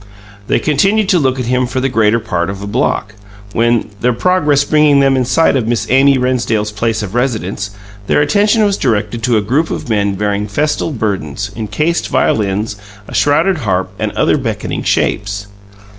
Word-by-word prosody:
They - - +2
continued 195 +8 +1
to 180 - +4
look 130 -3 0
at 125 - -2
him 125 +1 0
for 130 +1 -2
the 130 - 0
greater 115 -2 +2
part 85 -5 -2
of 100 +1 -6
block, 110 -3 -1 0.4
when, 115 -1 +1
their 125 0 +2
progress 150 -1 +2
bringing 150 -1 +3
them 135 -1 +3
in 130 -1 +1
sight 135 +5 +2
of 120 -4 0
Miss 120 -1 0
Amy 135 +1 +5
Rennsdale's 120 -4 0
place 110 +1 -1
of 100 -1 -6
residence 110 -5 -2 0.4
their - - +2
attention 205 +9 +3
was 200 -1 +1
directed 110 -2 -1
to 115 0 +2
a - - +2
group 135 +10 0
of - - -5
men 100 -2 0
bearing 105 +1 -1
festal 150 +10 -1
burdens 100 - -3
encased 150 +10 -1
violins, 105 0 0 0.3
a - - -10
shrouded 165 +6 +2
harp 95 -6 -1
and - - -1
other - - +2
beckoning - - -3
shapes. 100 0 -1
120 Hz, 175 wpm, -15 LUFS, 105-145 Hz, 0.4 s, Amy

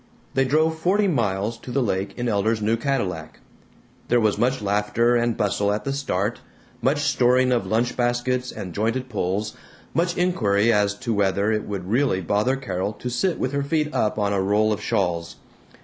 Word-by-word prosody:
They 135 0 +2
drove 160 +4 +1
forty 200 +5 +2
miles 115 - -1
to 125 - -11
the 130 +2 +1
lake 95 -2 -2
in 120 0 -2
Elder's 110 +1 +1
new 110 +2 +1
Cadillac. 110 - -3 0.7
There 120 - +3
was 110 -2 +2
much 130 +2 +1
laughter 105 +4 +1
and 120 -1 +1
bustle 100 0 +1
at 105 0 -2
the 135 - -2
start, 115 -6 -2 0.4
much 145 +3 +1
storing 130 -3 +3
of 115 -6 +1
lunch 115 +4 0
baskets 125 +1 0
and 90 -3 -7
jointed 115 +6 -1
poles, 105 0 -2 0.4
much 170 +1 0
inquiry 115 - +2
as 105 0 +2
to 120 +1 -3
whether 100 +1 +1
it 105 -1 -1
would 95 -3 -5
really 120 -2 +1
bother 105 +8 +1
Carol 100 -6 -3
to 125 +4 -6
sit 180 +8 0
with 130 - -1
her 140 0 -1
feet 150 +1 -1
up 105 - 0
on 100 -1 +1
a 100 - +1
roll 105 +3 +2
of 105 - -5
shawls. 85 -4 -1
115 Hz, 185 wpm, -23 LUFS, 100-130 Hz, 0.7 s, There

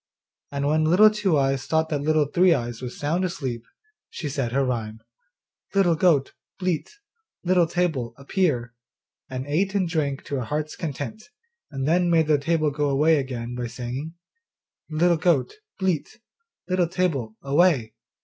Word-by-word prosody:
And 140 0 -2
when 155 +2 +2
Little 195 +7 +6
Two 205 -7 +1
eyes 135 -1 0
thought 160 0 +1
that 145 -2 -1
Little 155 0 +2
Three 170 +4 +4
eyes 120 -1 -4
was 125 -1 -6
sound 160 +6 0
asleep, 135 -11 -3 0.5
she 150 - -5
said 135 -4 -2
her 135 +2 +1
rhyme, 110 -3 -3 0.8
'Little 190 -4 +4
goat, 160 -5 +2 0.2
bleat, 185 - -2 0.5
Little 180 -2 +3
table, 155 -10 -1
appear,' 140 -5 -1 0.6
and 130 0 -4
ate 190 +7 0
and 190 -3 +2
drank 145 -5 -1
to 140 - -3
her 125 - -3
heart's 155 +4 -3
content, 165 - -6 0.4
and 135 0 -3
then 175 +2 +3
made 165 -2 +4
the 150 -1 +3
table 155 0 +1
go 145 0 0
away 150 +4 +4
again, 125 -3 -4
by 120 0 -3
saying, 125 +7 -6 0.7
'Little 170 +2 +3
goat, 160 - +1 0.2
bleat, 190 +2 -2 0.5
Little 180 -2 +2
table, 145 -11 -1
away. 140 -5 +2
150 Hz, 155 wpm, -24 LUFS, 135-175 Hz, 0.8 s, Little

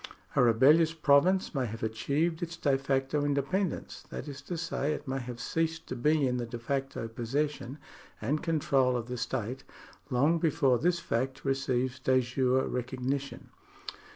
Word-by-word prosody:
A - - +5
rebellious 145 +8 +5
province 165 +6 +3
may 130 -4 0
have 115 +1 -7
achieved 140 +9 0
its 175 0 -4
de 140 -4 +2
facto 135 +2 0
independence, 145 +7 -1
that - - -6
is 140 -1 -7
to 175 - -2
say, 155 -2 -1
it - - -7
may 135 0 -1
have 120 -1 -7
ceased 165 +6 -1
to - - -5
be 150 +4 +2
in 125 -1 0
the 120 - -2
de 120 +1 -5
facto 135 0 -3
possession 135 +4 -2 0.4
and 150 +2 -1
control 140 -6 +2
of 115 - -4
the 125 +1 -5
state, 125 +1 -3 0.5
long 145 +6 +3
before 135 -6 +2
this 175 +1 +2
fact 135 -3 -2
receives 130 -1 0
de 130 0 +3
jure 130 +1 +1
recognition. 130 +2 -3
135 Hz, 160 wpm, -30 LUFS, 125-150 Hz, 0.5 s, A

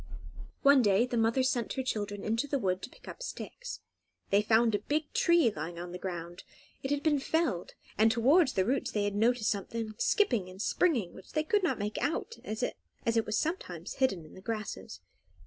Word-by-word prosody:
One 280 -1 +7
day 205 +1 +4
the 250 - -4
mother 230 +3 +3
sent 250 -3 0
her 265 - -2
children 205 -4 -3
into 230 +6 0
the 280 - 0
wood 185 -6 0
to - - -6
pick - - -18
up - - -8
sticks. - - -6 0.5
They 200 +1 +5
found 225 +1 +3
a 205 - +2
big 295 +8 -2
tree 340 -9 +4
lying 170 +1 -5
on 175 +1 -6
the 180 - -6
ground. 175 -2 -6 0.4
It 270 - -3
had 290 0 0
been 295 -3 +3
felled, 305 - -1 0.2
and 220 +1 +6
towards 265 +7 +4
the 190 - +2
roots 260 +5 0
they 205 -1 0
noticed 225 +2 +2
something 215 +2 -3
skipping 240 - +2
and 185 +1 -12
springing, 235 - +1
which 190 - -13
they 310 - +1
could 410 +6 +2
not 360 - +1
make 210 +1 -3
out, 325 - -2
as 215 +3 -4
it 230 -2 -2
was 215 - 0
sometimes 195 - -3
hidden 195 -11 +2
in 155 - -15
the 185 - -12
grasses. 200 - -5
225 Hz, 200 wpm, -31 LUFS, 200-280 Hz, 0.5 s, One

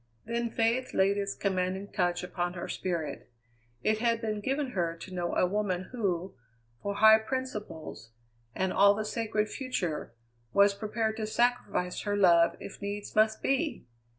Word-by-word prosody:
Then 235 +1 -1
faith 230 +3 0
laid 195 +1 +4
its 200 0 -2
commanding 190 0 -1
touch 175 0 0
upon 175 -1 -2
her 175 - -5
spirit. 160 -8 -3 0.5
It 215 0 +2
had 230 0 +2
been 215 -2 -2
given 270 +4 -1
her 170 -6 -1
to 185 +3 -10
know 175 -1 -2
a - - +4
woman 185 -1 -1
who, 190 -6 -2 0.5
for 200 0 -3
high 220 +1 +8
principles 210 - -5 0.5
and 190 0 0
all 200 +1 +6
the 215 +1 -2
sacred 215 -1 -1
future, 180 - -3 0.4
was 200 0 +5
prepared 220 +2 -2
to 215 -1 -2
sacrifice 220 -6 0
her 205 -1 -1
love 170 -4 +5
if 200 - -9
needs 205 0 -5
must 220 0 +3
be! 285 - 0
205 Hz, 155 wpm, -30 LUFS, 180-220 Hz, 0.5 s, high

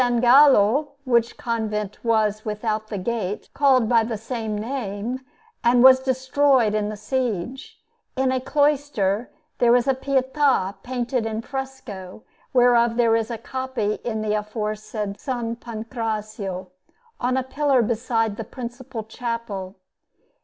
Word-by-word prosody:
Gallo 250 +2 +5
(which 235 -3 +1
convent 215 -3 -3
was 215 -2 +1
without 215 0 -2
the 215 - -4
Gate 210 0 -3
called 265 -5 +4
by 230 -1 +4
the 225 -1 -3
same 225 -1 -4
name, 230 +1 -4 0.4
and 240 +1 +5
was 260 0 +9
destroyed 260 -2 +2
in 210 -1 0
the 215 - -6
siege) 245 +1 -3 0.4
in 260 0 +1
a 260 - +1
cloister, 270 -7 +1 0.3
there 240 -1 +5
was 245 +1 +4
a 270 - +4
Pietà 265 -5 +1
painted 245 -2 -2
in 220 0 -3
fresco, 245 -8 -7 0.3
whereof 240 -2 +4
there 230 -2 +3
is 225 0 0
a 235 - -3
copy 245 -3 -3
in 220 -2 -2
the 210 -1 0
aforesaid 210 -1 -3
S. - - -22 0.3
Pancrazio, 215 -5 -5 0.5
on 255 +1 0
a 260 - +1
pillar 270 -1 +2
beside 225 -1 0
the - - -4
principal 245 -1 -7
chapel. 220 -4 -5
235 Hz, 130 wpm, -23 LUFS, 215-260 Hz, 0.5 s, was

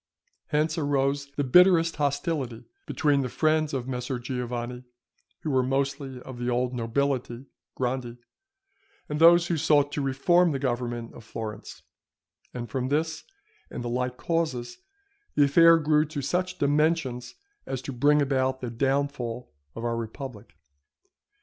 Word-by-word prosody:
Hence 155 +2 0
arose 140 -1 0
the 145 - 0
bitterest 165 +4 +5
hostility 145 -4 -2 0.2
between 145 -3 +2
the 130 - -3
friends 155 +2 +1
of 130 -2 -3
Messer 125 0 -3
Giovanni, 125 0 -4 0.6
who 155 - -2
were 130 -1 +3
mostly 135 0 -2
of 130 -2 -9
the 120 0 -2
old 125 +1 0
nobility 125 +1 -1 0.3
(grandi), 125 -1 -3 0.9
and 150 0 -3
those 170 +1 +7
who 175 -1 -1
sought 145 -2 +3
to 145 - -2
reform 160 +6 +3
the - - -1
government 120 -3 -3
of - - -12
Florence; 110 -1 -7 0.7
and 120 -1 -6
from 130 0 -2
this 155 +2 -1 0.4
and - - -6
the 120 - -3
like 125 +1 -2
causes, 130 -9 -2 0.6
the 145 - +5
affair 165 +4 +6
grew 150 -1 +3
to 150 -2 -5
such 180 +5 -1
dimensions 145 -4 0 0.3
as 135 - -3
to 135 - -5
bring 145 +4 +3
about 130 -1 0
the 125 -2 -5
downfall 125 - -2 0.2
of 115 - -5
our 115 0 0
republic. 115 0 -7
135 Hz, 145 wpm, -26 LUFS, 125-150 Hz, 0.9 s, those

